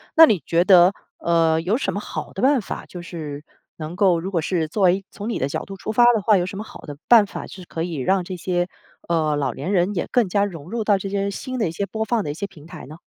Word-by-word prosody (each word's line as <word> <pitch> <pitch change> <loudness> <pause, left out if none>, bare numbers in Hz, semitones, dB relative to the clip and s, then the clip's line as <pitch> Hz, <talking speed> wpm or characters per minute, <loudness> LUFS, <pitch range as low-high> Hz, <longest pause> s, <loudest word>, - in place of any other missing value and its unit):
那 325 -1 +10
你 210 - +1
觉 170 +1 +3
得， 185 -1 +7 0.3
呃， 165 -1 +2
有 195 +7 0
什 - - -2
么 200 - -2
好 - - -6
的 - - -5
办 270 +1 +4
法， 205 - -7
就 175 -1 -9
是 150 -4 -7 0.3
能 160 +2 -7
够， 185 -4 +3
如 190 +3 -5
果 170 -4 0
是 165 -1 -1
作 200 +7 -4
为， 190 +1 +3
从 205 +2 -6
你 235 - -1
的 135 - -1
角 - - -4
度 195 - -9
出 215 - -4
发 240 +2 +6
的 210 - -1
话， 215 -3 +5
有 175 - 0
什 195 - -6
么 210 - -4
好 - - -12
的 145 -2 -9
办 225 -4 +7
法， - - -7
是 185 -2 -11
可 165 -1 -4
以 170 -4 -4
让 185 +8 +1
这 185 +1 -6
些， 175 0 -1 0.4
呃， 155 -3 +1
老 135 -4 -1
年 190 - -4
人 185 +1 +2
也 175 - -2
更 245 -5 +3
加 200 +2 +1
融 175 -3 -6
入 230 -2 -2
到 205 -2 +3
这 195 - -5
些 200 0 -1
新 255 +5 -5
的 215 - +1
一 160 - -3
些 200 +4 -3
播 220 +3 -3
放 220 -1 0
的 145 - -3
一 - - -4
些 200 +5 -5
平 155 -6 -16
台 160 - -10
呢？ 155 +2 -11
185 Hz, 305 characters per minute, -22 LUFS, 165-205 Hz, 0.4 s, 那